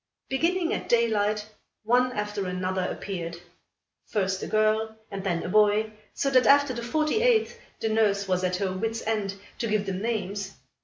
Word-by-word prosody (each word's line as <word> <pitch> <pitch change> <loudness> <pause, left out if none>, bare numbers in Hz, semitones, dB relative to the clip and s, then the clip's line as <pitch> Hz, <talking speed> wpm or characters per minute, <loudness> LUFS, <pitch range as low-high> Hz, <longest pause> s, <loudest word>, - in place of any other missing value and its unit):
Beginning 335 +5 +1
at - - -4
daylight, 215 -3 +2 0.4
one 250 +3 +3
after 210 -2 -3
another 185 +1 -1
appeared 170 -4 -5 0.7
first 190 -3 -1
a - - -4
girl 220 +1 +1
and 195 -1 -5
then 175 -4 -1
a - - -4
boy; 215 +2 +3 0.2
so 275 - -1
that 255 -3 +5
after 285 -1 +5
the 235 - -5
forty 305 - 0
eighth, 470 -3 +2 0.2
the - - 0
nurse 205 -2 +2
was 185 -1 0
at 180 0 +1
her 190 0 -1
wit's 225 +4 -3
end, 210 -3 -1 0.2
to 230 - -1
give 210 -1 0
them 190 -1 -3
names. 205 -2 -3
215 Hz, 170 wpm, -27 LUFS, 195-235 Hz, 0.7 s, that